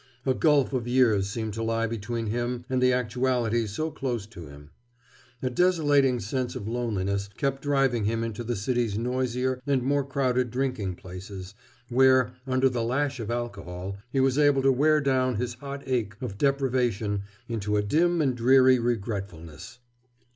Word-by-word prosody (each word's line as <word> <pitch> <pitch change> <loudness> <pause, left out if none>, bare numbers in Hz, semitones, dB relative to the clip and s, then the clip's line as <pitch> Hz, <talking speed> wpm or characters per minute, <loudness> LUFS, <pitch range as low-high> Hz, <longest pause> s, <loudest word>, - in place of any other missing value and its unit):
A 130 - +3
gulf 145 -1 +3
of 120 -2 -1
years 115 -6 +3
seemed 110 0 -4
to 115 - -4
lie 115 0 0
between 115 +1 -3
him 120 +2 -2
and 130 -1 +1
the 125 0 +5
actualities 120 -2 0
so 155 +6 -2
close 125 -7 -3
to 90 -8 -11
him. 70 +1 -14 0.7
A 130 - +1
desolating 145 -6 +3
sense 125 +4 -3
of 100 - -5
loneliness 100 -4 -2
kept 135 -2 -1
driving 135 -6 +1
him 115 +2 0
into 115 0 -4
the 120 +1 -2
city's 115 0 -1
noisier 125 +1 -1
and 135 -3 +2
more 140 +2 +1
crowded 130 -3 0
drinking 125 -7 -2
places, 95 +1 -9 0.3
where, 130 0 +4
under 130 0 +3
the 125 -2 -1
lash 130 +3 -1
of 110 -1 -5
alcohol, 100 -6 -4 0.2
he 135 - 0
was 135 +1 +2
able 145 -2 +4
to 135 - +5
wear 150 +4 +3
down 130 -3 +1
his 120 +3 -2
hot 140 +3 -8
ache 120 -6 -1
of 120 -6 -5
deprivation 125 -6 0 0.3
into 105 -3 -1
a 105 - +1
dim 165 +9 +2
and 130 -3 +1
dreary 130 +1 +5
regretfulness. 100 -8 -4
120 Hz, 165 wpm, -26 LUFS, 110-130 Hz, 0.7 s, the